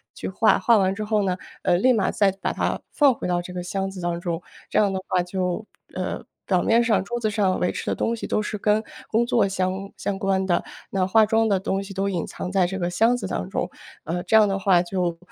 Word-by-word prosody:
去 - - -5
化， - - +3
化 235 -2 +4
完 190 -1 +2
之 215 - -4
后 215 0 +1
呢， 185 -1 0 0.2
呃， 175 - +3
立 255 +7 +4
马 210 -5 +1
再 200 -2 +2
把 - - 0
它 - - -1
放 285 -3 +4
回 - - -5
到 175 -1 +1
这 180 - -8
个 180 - -4
箱 195 +2 -3
子 190 -1 -8
当 175 0 -2
中。 170 -1 -3 0.3
这 - - +2
样 205 -2 +3
的 190 - -2
话 180 - +2
就 180 +3 -2 0.3
呃， - - -4 0.2
表 185 -2 +2
面 230 +1 +3
上 225 -3 +2
桌 240 +3 -3
子 220 - 0
上 200 -3 +1
维 180 - +1
持 - - -5
的 - - 0
东 230 - 0
西 230 - -6
都 - - 0
是 210 0 -4
跟 210 +2 +2 0.3
工 230 +2 +2
作 230 -4 +2
相 190 +1 -2
相 195 -1 -3
关 190 -1 +1
的， 175 -2 +2 0.3
那 190 -1 0
化 220 +3 +5
妆 225 +1 +2
的 195 -3 +2
东 195 +1 -1
西 195 - -9
都 195 +1 -1
隐 175 -4 -2
藏 180 - -6
在 190 -2 +3
这 190 +2 -4
个 175 -2 -1
箱 225 +7 +3
子 245 - -4
当 - - -3
中。 - - -2 0.3
呃， 175 +2 -3
这 220 - +1
样 215 -1 +7
的 195 0 -1
话 185 -3 +4
就 175 -2 -2
195 Hz, 275 characters per minute, -24 LUFS, 180-215 Hz, 0.3 s, 样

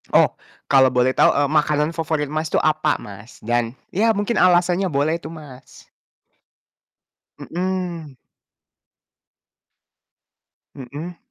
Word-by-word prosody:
Oh - - +6 0.4
kalo 135 -1 +6
boleh 125 +1 +3
tau, - - +5
eee, 145 0 +1
makanan 150 0 +1
favorit 155 -3 -2
Mas 155 +1 -2
tuh - - +2
apa, 155 -1 +2
Mas? 100 +3 -12
Dan 120 +1 -1 0.2
ya 225 +4 +2
mungkin 205 +3 -1
alasannya 180 +1 +3
boleh 150 +4 +1
tuh, 160 -1 -9
Mas. 140 -5 -14 1.5
Mhm. 175 -5 -4 2.6
Mhm. 150 +7 -8
155 Hz, 105 wpm, -21 LUFS, 135-175 Hz, 2.6 s, Oh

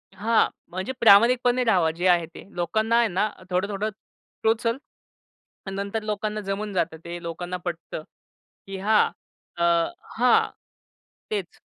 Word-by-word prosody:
हां, 220 +3 +3 0.2
म्हणजे 185 +8 -3
प्रामाणिकपणे 240 +4 +6
राहावा. 180 -8 +3
जे 175 +3 -1
आहे 175 -2 +4
ते 165 - -13
लोकांना 220 +7 +1
आहे 235 -1 +4
ना 195 +3 0 0.2
थोडं-थोडं 200 +3 -1 0.5
टोचल, 230 +2 +2 0.9
नंतर 200 +3 -3
लोकांना 215 0 -2
जमून 205 +1 -2
जातं, 170 -3 -1
ते 170 0 -6
लोकांना 175 +2 -4
पटतं, 170 -2 -5 0.6
की 195 0 -6
हां, 215 +3 +3 0.5
अ, 170 - 0 0.5
हां 250 +2 +4 0.8
तेच. 200 -5 -4
200 Hz, 125 wpm, -25 LUFS, 175-220 Hz, 0.9 s, प्रामाणिकपणे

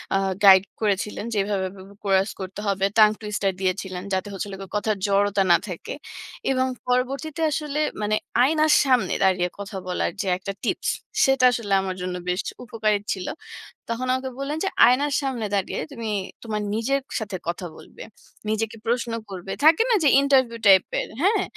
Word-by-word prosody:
আ - - +4 0.3
guide 190 -1 +9 0.2
করেছিলেন। 210 0 -1
যে - - -2
এভাবে, 195 -2 -1
এভাবে 195 0 -13
কোরাস 195 0 +2
করতে 190 +1 -7
হবে। 195 -1 +1
টাং 215 -1 +8
টুইস্টার 210 -2 -1
দিয়েছিলেন। 185 -1 -2
যাতে 190 +1 -1
হচ্ছে 195 +1 -4
হলো 195 -1 -7
গিয়ে 195 - -10
কথার 210 0 -1
জড়তা 200 0 +2
না 170 - +7
থাকে। - - -6 0.6
এবং 260 0 +1 0.2
পরবর্তীতে 275 +6 -1
আসলে 300 0 -2 0.2
মানে 210 +1 +1 0.3
আয়নার 310 +2 +3
সামনে 250 -8 +2
দাঁড়িয়ে 180 -2 +2
কথা 200 0 -6
বলার 180 - -1
যে 200 - -4
একটা 195 +1 -5
টিপস, - - -1 0.4
সেটা 270 -1 +3
আসলে 215 -4 -2
আমার 190 -1 -3
জন্য 180 0 -3
বেশ 180 +2 0 0.2
উপকারী 215 -2 0
ছিল। 185 -2 -6 0.6
তখন 235 +2 -2
আমাকে 260 0 -3
বললেন 285 +3 -3
যে, - - +1 0.2
আয়নার 280 +4 +3
সামনে 255 -5 -2
দাঁড়িয়ে 195 -2 -1
তুমি 230 -4 -5 0.4
তোমার 215 -2 -2
নিজের 270 +5 0 0.2
সাথে 205 -3 -4
কথা 175 +1 -3
বলবে। - - -13 0.5
নিজেকে 220 +1 -2
প্রশ্ন 235 0 0 0.2
করবে। 190 0 -7
থাকে 320 +6 +6
না - - +5
যে - - +6
ইন্টারভিউ 260 -4 +2
টাইপ 190 -1 +7 0.2
এর, - - -5
হ্যাঁ? 400 +1 +3
215 Hz, 175 wpm, -24 LUFS, 195-260 Hz, 0.6 s, guide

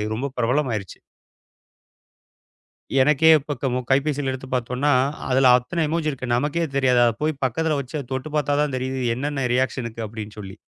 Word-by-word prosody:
ரொம்ப 125 +5 -3
பிரபலமாயிருச்சு. 120 -5 -1 2.0
எனக்கே 150 +3 +4
இப்ப 145 +1 -5
க - - -3
நம்ம 125 +1 -1
கைப்பேசியில 140 0 +1
எடுத்துப் 130 0 -8
பாத்தோன்னா, 125 +4 0 0.4
அதுல 130 0 +4
அத்தன 165 +7 -2
எமொஜி 160 0 -1
இருக்கு 130 -3 -6
நமக்கே 150 +6 0
தெரியாது. 130 -3 +3
அதப் 115 -1 +1
போய்ப் 155 -2 -1
பக்கத்துல 155 +5 0
வச்சு 140 +3 -5
தொட்டுப் 130 +4 -4
பாத்தா 145 -1 +1
தான் 145 -3 -2
தெரியுது. 130 +1 -3
என்னென்ன 140 +2 -2
ரியாக்ஷனுக்கு 125 -3 -2
அப்டின்னு 105 -1 -8
சொல்லி. 95 -2 -8
130 Hz, 150 wpm, -23 LUFS, 125-150 Hz, 2.0 s, எனக்கே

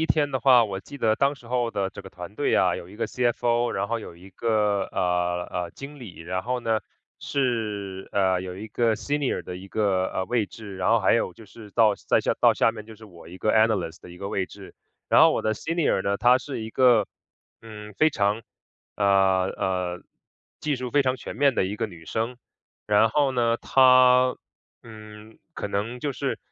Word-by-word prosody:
1 160 - +1
天 145 -2 +1
的 130 -2 -2
话， 125 -4 +6
我 95 -2 -5
记 140 - -11
得 110 -3 +2
当 140 +1 +2
时 130 -4 -17
候 120 -1 0
的 100 -3 -2
这 - - -10
个 - - -11
团 - - -10
队 - - 0
啊， - - +3
有 85 - -9
一 105 - -13
个 115 0 -2
CFO， 120 0 0
然 100 +1 -2
后 115 - -1
有 95 -6 -10
一 95 +3 -15
个， 105 -1 0
呃， 90 -1 0
呃， 90 -1 -3
经 145 +2 -10
理。 105 -10 -10
然 90 +3 -3
后 125 +1 -2
呢， 110 -2 0 0.4
是， 105 -8 -2
呃， 95 -2 +2
有 90 -1 -7
一 105 +3 -7
个 115 +1 +1
senior 145 +2 -2
的 90 - -7
一 95 +2 -11
个， 95 -2 +1
呃， 95 - -2
位 115 0 0
置， 100 -2 -10
然 90 -1 0
后 115 0 +4
还 95 - +3
有 115 -5 0
就 110 - -15
是 105 +1 -14
到 110 0 +4
再 - - +1
下 - - 0
到 - - +6
下 - - +3
面， 110 -2 -9
就 110 0 -12
是 110 - -14
我 85 -5 -14
一 90 - -10
个 110 - +1
analyst 110 -7 +1
的 - - -12
一 90 - -12
个 100 - -5
位 95 -2 -1
置。 - - -13 0.3
然 - - +5
后 - - +7
我 - - -1
的 110 - 0
senior 165 - 0
呢， 100 +1 0
她 125 +5 +4
是 130 -2 -6
一 110 - -6
个， 120 -5 +4 0.6
嗯， 105 -2 -10
非 155 - +5
常， 105 -3 0 0.5
呃， 100 - 0 0.5
呃， 90 -1 -2 0.6
技 150 -2 -1
术 125 0 -5
非 145 +2 +3
常 130 -1 0
全 - - -8
面 140 -3 +3
的 - - +1
一 100 +3 -4
个 115 +1 -1
女 85 -5 -13
生。 115 +7 -3 0.5
然 105 +1 +4
后 140 +4 +2
呢， 120 -2 +1
她， 130 -1 +5 0.5
嗯， 110 -1 -13 0.2
可 - - -4
能 105 +5 -3
就 145 +1 -2
是 - - -3
110 Hz, 270 characters per minute, -25 LUFS, 95-125 Hz, 0.6 s, 后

